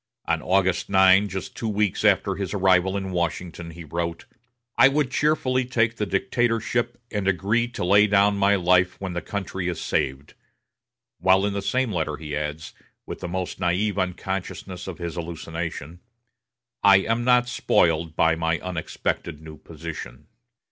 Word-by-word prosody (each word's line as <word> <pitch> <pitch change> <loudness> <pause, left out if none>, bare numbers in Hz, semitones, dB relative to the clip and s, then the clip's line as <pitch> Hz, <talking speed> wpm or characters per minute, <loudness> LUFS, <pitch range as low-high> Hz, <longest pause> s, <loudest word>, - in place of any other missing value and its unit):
On - - 0
August 95 -1 +1
9, 95 +1 +5
just 95 0 -6
two 115 - -3
weeks 105 -2 0
after - - +3
his 100 0 -4
arrival 95 0 +3
in 95 -1 -4
Washington, 85 -1 -3
he 85 +1 -10
wrote: 85 +1 -4 0.5
"I 130 - +7
would 140 -1 0
cheerfully 135 -3 +1
take 115 -2 0
the 105 - -2
dictatorship 120 +4 0
and 100 -2 -2
agree 100 +5 +1
to 120 -6 -4
lay 100 +3 +5
down 100 0 +3
my 100 +1 +3
life 90 0 +2
when 95 -2 -4
the 85 - -3
country 95 -2 -4
is 90 -3 -3
saved;" 65 +2 -2 0.9
while 95 +2 +4
in 105 - -1
the 100 - -2
same 125 +4 0
letter 75 -3 -2
he 75 -2 -6
adds, 75 +1 -4 0.3
with - - -7
the - - -5
most 90 +1 -4
naïve 95 +3 0
unconsciousness 95 0 -4
of 95 - -6
his 85 -2 -5
hallucination: 85 -1 -6 0.8
"I 100 -1 +7
am 115 +4 -1
not 125 0 +4
spoiled 80 -9 +1
by 80 0 +3
my 80 0 0
unexpected 85 -2 -4
new 80 0 -11
position." 80 -6 -8
95 Hz, 160 wpm, -24 LUFS, 85-105 Hz, 0.9 s, I